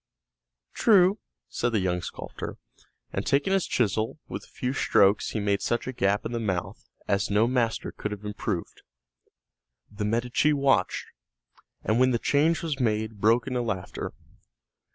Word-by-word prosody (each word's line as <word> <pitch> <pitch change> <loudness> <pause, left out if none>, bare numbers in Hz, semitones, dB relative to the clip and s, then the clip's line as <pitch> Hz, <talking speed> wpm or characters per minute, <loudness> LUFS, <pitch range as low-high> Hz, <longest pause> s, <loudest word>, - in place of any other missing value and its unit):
"True," 200 -2 +5 0.3
said 120 0 -1
the 110 - +3
young 90 -2 0
sculptor, - - -7 0.6
and - - -1
taking 145 +8 +2
his 195 -2 +1
chisel, 110 0 0
with - - -6
a - - -21
few 125 +1 -3
strokes 100 -6 +3
he 110 - -2
made 100 -1 0
such 120 - -1
a 130 - -4
gap 100 -3 +1
in - - -3
the 120 - -2
mouth 95 -6 -3 0.2
as 100 0 +1
no 105 +2 +4
master 120 -2 0
could 105 - -5
have 105 0 -7
improved. 105 0 -4 1.1
The 105 0 -3
Medici 120 +7 +2
watched, 135 -10 +2 0.8
and 110 +2 +1
when 130 0 +5
the 120 - +2
change 155 +8 +2
was 150 -4 -2
made, 110 -3 -1
broke 115 +4 +4
into 125 -2 -1
laughter. 105 -6 -4
115 Hz, 155 wpm, -27 LUFS, 105-130 Hz, 1.1 s, True